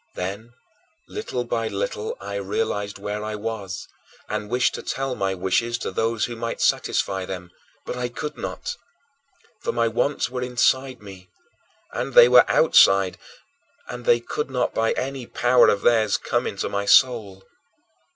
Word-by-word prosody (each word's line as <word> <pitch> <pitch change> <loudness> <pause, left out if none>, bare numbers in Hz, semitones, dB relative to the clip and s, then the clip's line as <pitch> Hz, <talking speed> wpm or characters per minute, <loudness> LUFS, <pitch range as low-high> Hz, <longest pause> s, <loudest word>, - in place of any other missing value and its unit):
Then, 100 +6 -5 0.6
little 125 - -4
by 115 -1 -2
little, 100 +1 -3
I 100 +1 -7
realized 100 +1 -2
where 105 +1 -4
I 110 0 -4
was 105 -4 -5 0.4
and 105 - -4
wished 125 +2 +2
to - - -5
tell 135 -1 -3
my 95 -5 -1
wishes 95 +6 0
to - - -4
those 115 0 0
who 120 - -6
might 115 0 -4
satisfy 95 -1 0
them, 90 -1 -7 0.3
but - - -4
I 125 0 -3
could 150 +5 -6
not! - - -5 0.9
For - - -1
my 115 -1 +1
wants 120 +6 0
were 125 0 -5
inside 125 0 +1
me, 95 -2 -12 0.6
and - - -4
they - - +10
were - - +6
outside, 95 - +5 0.7
and 125 -1 -7
they 120 - +5
could 140 +5 -4
not 125 -2 -1
by 115 0 +1
any 130 -2 -4
power 120 0 +4
of 100 - 0
theirs 110 -3 +3
come - - -1
into - - -3
my 100 0 -3
soul. 105 -5 +3
115 Hz, 160 wpm, -23 LUFS, 100-125 Hz, 0.9 s, they